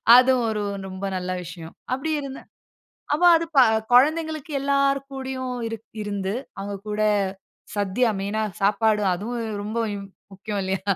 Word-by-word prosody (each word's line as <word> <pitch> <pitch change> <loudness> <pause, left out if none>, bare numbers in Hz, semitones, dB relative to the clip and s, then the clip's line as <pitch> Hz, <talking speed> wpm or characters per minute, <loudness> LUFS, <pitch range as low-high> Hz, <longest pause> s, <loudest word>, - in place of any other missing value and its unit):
அதுவும் 255 -1 +5
ஒரு 210 -1 -2 0.2
ரொம்ப 190 +1 -5
நல்ல 185 0 -3
விஷயம். 165 -1 -9 0.2
அப்படி 270 +5 -2
இருந்த 270 -1 -6 0.8
அப்போ 350 +4 +3
அது 330 0 -1 0.5
கொழந்தைங்களுக்கு 310 +3 +3
எல்லார் 275 0 +2
கூடையும் 260 -1 -4 0.5
இருந்து. 200 -2 -2 0.3
அவங்க 200 +1 -4
கூட 210 0 -2 0.8
சத்திய 205 +5 +1
மெயினா 205 +3 -1 0.2
சாப்பாடு, 210 +1 +3
அதுவும் 230 +6 -4 0.2
ரொம்ப 215 +3 -3 0.2
ம் 200 0 -7 0.3
முக்கியம் 200 +1 -4
இல்லையா? 190 0 -2
220 Hz, 125 wpm, -24 LUFS, 200-270 Hz, 0.8 s, அதுவும்